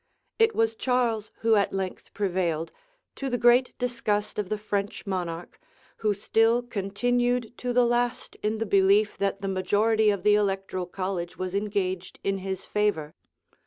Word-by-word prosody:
It 450 0 +4
was 225 0 +2
Charles 235 -4 0
who 225 0 +3
at 200 -2 +2
length 190 -1 -4
prevailed, 175 -5 -1 0.4
to 275 - -4
the 245 - 0
great 240 +2 +4
disgust 230 -5 -1
of 200 -3 -2
the 215 - -1
French 205 -1 -3
monarch, 175 -3 -4 0.4
who 210 -2 0
still 225 +4 +2
continued 245 +3 -1
to 250 - -2
the 245 0 +4
last 240 0 0
in 215 +1 0
the 225 - -2
belief 200 +1 +4
that 195 0 -1
the - - -1
majority 210 +3 +2
of 200 -3 0
the 210 - +5
electoral 195 -3 0
college 185 -1 -4
was 185 0 -4
engaged 195 -3 -2
in 195 0 0
his 190 0 -4
favor. 205 -8 0
205 Hz, 160 wpm, -26 LUFS, 190-230 Hz, 0.4 s, the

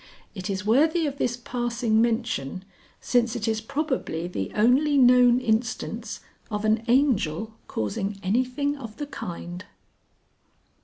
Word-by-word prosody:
It 190 -2 -6
is 200 +1 -3
worthy 315 +9 +3
of 285 -1 -4
this 240 0 0
passing 240 -2 0
mention, 225 - -1 0.3
since 240 -1 +1
it 230 -2 -3
is 220 -1 0
probably 260 - -2
the 95 - -4
only 265 +7 +4
known 250 -1 +6
instance 225 -1 -2 0.3
of 210 -1 -2
an 220 +1 +2
Angel 225 - +2
causing 195 - -3
anything 255 +8 0
of 230 -6 -9
the 295 - -3
kind. 175 - -7
230 Hz, 125 wpm, -25 LUFS, 205-255 Hz, 0.3 s, known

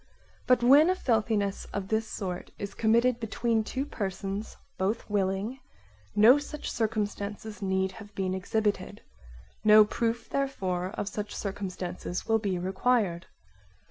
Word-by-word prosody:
But 250 -1 +4
when 285 +7 +7
a 370 - +3
filthiness 215 - 0
of 200 -1 -5
this 220 0 0
sort 185 -4 -5
is 200 0 -5
committed 235 +2 +3
between 225 0 0
two 265 +5 -3
persons, 195 -2 -4 0.2
both 195 +4 -1
willing, 200 +5 0 0.6
no 230 +7 +7
such 295 +1 -6
circumstances 210 -1 -3
need 190 -1 0
have 205 +1 -12
been 185 -1 -1
exhibited; 205 +1 -1 0.6
no 215 0 +8
proof 230 +2 -2
therefore 190 -10 -1
of 205 - -2
such 210 0 -4
circumstances 185 -3 -4
will 225 0 +3
be 195 -4 -1
required. 190 0 0
210 Hz, 130 wpm, -28 LUFS, 190-230 Hz, 0.6 s, no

